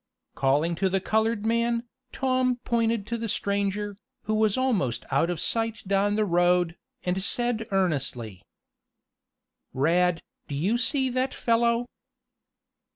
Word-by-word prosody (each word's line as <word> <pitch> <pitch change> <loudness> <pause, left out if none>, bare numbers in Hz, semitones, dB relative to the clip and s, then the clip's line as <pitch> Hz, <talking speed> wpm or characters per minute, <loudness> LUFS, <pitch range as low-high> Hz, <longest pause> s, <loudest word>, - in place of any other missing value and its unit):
Calling 145 +5 +1
to 190 +3 0
the 195 +1 +1
colored 220 +2 0
man, 235 +1 +1 0.3
Tom 255 -1 +1
pointed 230 -3 +1
to 235 +2 -3
the 230 -1 -3
stranger, 200 +1 -1 0.3
who 215 - -1
was 215 0 +2
almost 195 - 0
out 140 +5 +2
of 175 -3 -2
sight 225 +3 -1
down 200 +1 +2
the 215 0 +2
road, 175 -1 +2 0.3
and 180 +1 -1
said 235 +1 -1
earnestly: 135 - -1 1.3
"Rad, 170 +5 +2 0.2
do 140 - -4
you 195 +12 +1
see 265 +2 +2
that 255 +2 -1
fellow?" 235 +1 +2
205 Hz, 130 wpm, -26 LUFS, 175-235 Hz, 1.3 s, was